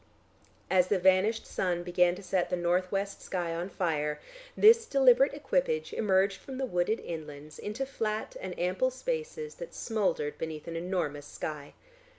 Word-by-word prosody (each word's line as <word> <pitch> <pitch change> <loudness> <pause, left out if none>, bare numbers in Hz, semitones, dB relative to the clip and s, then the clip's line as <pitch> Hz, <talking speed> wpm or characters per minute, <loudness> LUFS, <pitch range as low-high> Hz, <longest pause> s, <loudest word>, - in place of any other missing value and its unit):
As 185 -1 +3
the 200 - +2
vanished 190 +5 +3
sun 175 -2 -1
began 175 0 +3
to 200 - -10
set 185 -1 0
the - - +1
north 180 +1 0
west 200 0 -2
sky 175 -3 -3
on 170 +3 -3
fire, 150 -5 -1 0.4
this 455 +1 +7
deliberate 270 0 +5
equipage 475 - 0
emerged 195 -2 +2
from 265 -1 -8
the 265 - -1
wooded 180 +1 0
inlands 155 -2 -8
into 215 +6 -3
flat 220 -5 -3
and 185 -1 -6
ample 185 +9 +1
spaces 465 - -4
that - - -7
smouldered 200 -9 -1
beneath 160 -1 -5
an 165 - -5
enormous 165 -5 -2
sky. 145 -1 -6
190 Hz, 160 wpm, -30 LUFS, 175-245 Hz, 0.4 s, this